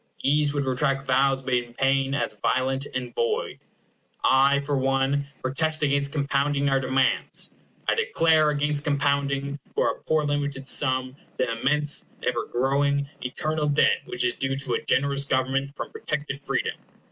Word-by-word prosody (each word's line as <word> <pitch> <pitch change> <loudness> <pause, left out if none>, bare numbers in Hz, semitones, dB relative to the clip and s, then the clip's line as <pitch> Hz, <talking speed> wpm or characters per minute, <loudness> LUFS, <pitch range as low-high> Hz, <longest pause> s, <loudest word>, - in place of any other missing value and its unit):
"Ease 145 +1 +3
would 145 -1 -1
retract 135 +1 +1
Vows 135 +1 +2
made 125 -2 +1
in 120 0 -16
pain, 135 +1 +1
as 140 - -1
violent 130 +5 0
and 125 -2 -4
void." 115 - -1 0.6
I, 135 +2 +4
for 140 0 -2
one, 135 +1 +1 0.2
protest 155 +4 -1
against 140 -1 +1
compounding 140 -1 0
our 135 0 +2
demands. 130 0 0 0.4
I - - +4
declare 165 - +3
against 145 0 0
compounding, 140 -1 0 0.2
for - - +2
a - - -10
poor 155 -1 +1
limited 145 -2 -2
sum, 130 -2 +2 0.2
the 125 -2 0
immense, 150 +1 +1 0.2
ever - - 0
growing, 140 +3 +1
eternal 150 +4 -2
debt 145 0 +3
which 370 - -2
is 370 - +2
due 135 0 0
to 135 -2 -2
generous 140 0 +2
government 135 +1 -1
from - - -6
protected 150 -2 -4
freedom. - - -1
140 Hz, 150 wpm, -25 LUFS, 135-145 Hz, 0.6 s, I